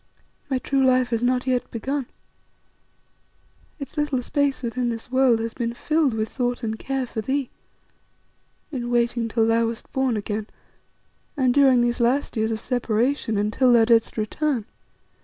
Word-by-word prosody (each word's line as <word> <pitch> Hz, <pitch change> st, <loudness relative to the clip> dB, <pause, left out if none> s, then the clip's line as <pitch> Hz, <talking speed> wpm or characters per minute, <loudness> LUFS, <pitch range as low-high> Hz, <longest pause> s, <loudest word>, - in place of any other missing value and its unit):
My 265 Hz, -, +1 dB
true 270 Hz, +1 st, 0 dB
life 255 Hz, -1 st, +3 dB
has 230 Hz, -1 st, 0 dB
not 250 Hz, +1 st, +1 dB
yet 255 Hz, -2 st, 0 dB
begun. 265 Hz, +3 st, -3 dB, 1.7 s
Its 285 Hz, +1 st, -9 dB
little 290 Hz, -4 st, 0 dB
space 285 Hz, -1 st, 0 dB
within 240 Hz, +1 st, -1 dB
this 230 Hz, +1 st, -6 dB
world 260 Hz, -3 st, +4 dB
has 225 Hz, 0 st, -3 dB
been 235 Hz, -1 st, -3 dB
filled 305 Hz, -3 st, +1 dB
with 220 Hz, 0 st, -1 dB
thought 245 Hz, 0 st, -2 dB
and 220 Hz, -1 st, -3 dB
care 270 Hz, -1 st, -2 dB
for 225 Hz, -2 st, -5 dB
thee; 265 Hz, +3 st, -2 dB, 1.2 s
in 245 Hz, -4 st, -4 dB
waiting 235 Hz, -1 st, +1 dB
till 225 Hz, 0 st, +1 dB
thou 230 Hz, 0 st, +2 dB
wast 230 Hz, 0 st, -7 dB
born 265 Hz, -4 st, 0 dB
again, 210 Hz, +1 st, -3 dB, 0.9 s
and 255 Hz, -3 st, +3 dB
during 265 Hz, -3 st, +5 dB
these 240 Hz, +1 st, 0 dB
last 255 Hz, +5 st, +1 dB
years 220 Hz, 0 st, 0 dB
of 220 Hz, -, -2 dB
separation, 240 Hz, -1 st, 0 dB
until 215 Hz, +5 st, +2 dB
thou 235 Hz, -2 st, +6 dB
didst 230 Hz, -1 st, +2 dB
return. 235 Hz, +2 st, -1 dB
245 Hz, 160 wpm, -23 LUFS, 230-265 Hz, 1.7 s, thou